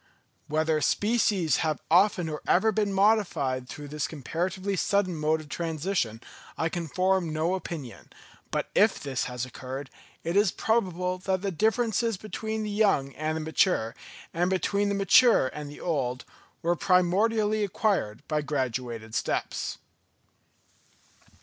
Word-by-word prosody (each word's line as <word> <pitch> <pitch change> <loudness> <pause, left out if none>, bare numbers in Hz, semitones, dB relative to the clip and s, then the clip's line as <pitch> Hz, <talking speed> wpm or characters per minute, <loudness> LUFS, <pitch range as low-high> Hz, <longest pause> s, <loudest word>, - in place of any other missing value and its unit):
Whether 155 0 +1
species 205 - +2
have 155 -2 0
often 180 -1 +4
or 155 -1 -4
ever 220 +5 +4
been 210 -1 0
modified 190 - +1
through 145 -1 -8
this 150 -2 -2
comparatively 180 +7 -3
sudden 190 -1 +1
mode 155 +1 +1
of 155 - -13
transition, 160 - -2 0.4
I 160 - 0
can 170 0 -4
form 185 +1 +1
no 160 +3 0
opinion; 165 -9 -6 0.4
but - - -2
if - - +4
this 135 -3 -2
has 125 0 -4
occurred, 130 +2 -7 0.3
it 170 +2 -2
is 200 -2 +4
probable 185 -5 0
that 190 0 -1
the 200 - -1
differences 225 +3 +1
between 220 +2 -4
the 210 - -3
young 195 -10 +2
and 155 +1 -2
the - - -3
mature, 160 - +1 0.4
and 175 +2 +1
between 200 +2 +1
the 200 - 0
mature 200 - +5
and 150 -1 -6
the 145 - -11
old, 130 -7 -2 0.4
were 170 +1 +2
primordially 210 +5 +2
acquired 195 - -1
by 155 -1 0
graduated 125 -5 -3
steps. - - -2
175 Hz, 140 wpm, -27 LUFS, 150-200 Hz, 0.4 s, mature